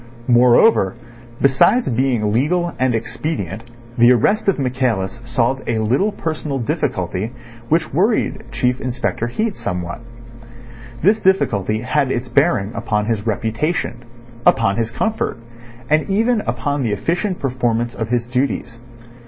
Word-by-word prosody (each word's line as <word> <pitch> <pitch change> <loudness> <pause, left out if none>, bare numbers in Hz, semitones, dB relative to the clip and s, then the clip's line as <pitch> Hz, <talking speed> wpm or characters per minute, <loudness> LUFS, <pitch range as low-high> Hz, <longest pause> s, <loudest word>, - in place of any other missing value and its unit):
Moreover, 120 - +5 0.4
besides 140 - +3
being 120 -4 +1
legal 170 +8 +1
and 130 -2 +2
expedient, 115 - -4 0.3
the 120 +1 +7
arrest 200 - +2
of 195 - +1
Michaelis 125 -7 -1
solved 120 +2 0
a 115 - +1
little 125 - +1
personal 155 -6 -3
difficulty 110 -3 -2 0.4
which 155 -2 +1
worried 205 - +1
Chief 125 0 0
Inspector 125 -2 -2
Heat 215 - -2
somewhat. 90 -1 -4 1.0
This 210 +5 +4
difficulty 110 - +1
had 130 +1 0
its 120 0 -3
bearing 130 - +2
upon 105 -3 -1
his 110 -1 -2
reputation, 115 - -2 0.4
upon 100 -2 +3
his 115 -1 0
comfort, 220 - -2 0.5
and 155 +4 +1
even 225 +3 +2
upon 125 +4 -1
the 115 -5 0
efficient 175 - -1
performance 120 -3 -1
of 115 - -4
his 120 -1 0
duties. 125 -2 -2
125 Hz, 130 wpm, -19 LUFS, 115-155 Hz, 1.0 s, the